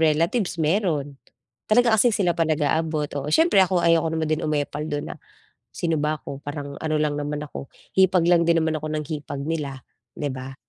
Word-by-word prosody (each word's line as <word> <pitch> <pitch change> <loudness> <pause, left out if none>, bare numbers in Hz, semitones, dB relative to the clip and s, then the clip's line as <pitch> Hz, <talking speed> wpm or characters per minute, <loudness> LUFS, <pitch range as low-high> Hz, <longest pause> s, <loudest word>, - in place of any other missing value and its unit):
relatives 165 +6 +1
mayro'n, 155 -4 0 0.6
talaga 235 +1 +4
kasi 220 +3 +5
sila 195 -6 +1
pa 165 -1 0
nag-aabot, 155 0 0
oo, 140 - -5
siyempre 320 - +4
ako 185 -1 +2
ayoko 165 -1 +4
naman 160 0 -1
din 155 - 0
umepal 150 0 -2
do'n 145 -1 -4
na, - - -9 0.6
sino 165 -3 0
ba 150 +1 0
ako? 135 - -8
Parang 145 -1 -7
ano 155 -1 -1
lang 150 -1 0
naman 150 0 -3
ako 145 -2 -8 0.3
hipag 185 -2 +5
lang 170 -1 +4
din 165 -1 +3
naman 160 -1 0
ako 155 - -5
ng 155 - -2
hipag 145 -2 -5
nila, 145 -4 -4 0.3
'di 145 -2 -3
ba? 130 +1 -7
155 Hz, 190 wpm, -24 LUFS, 145-170 Hz, 0.6 s, kasi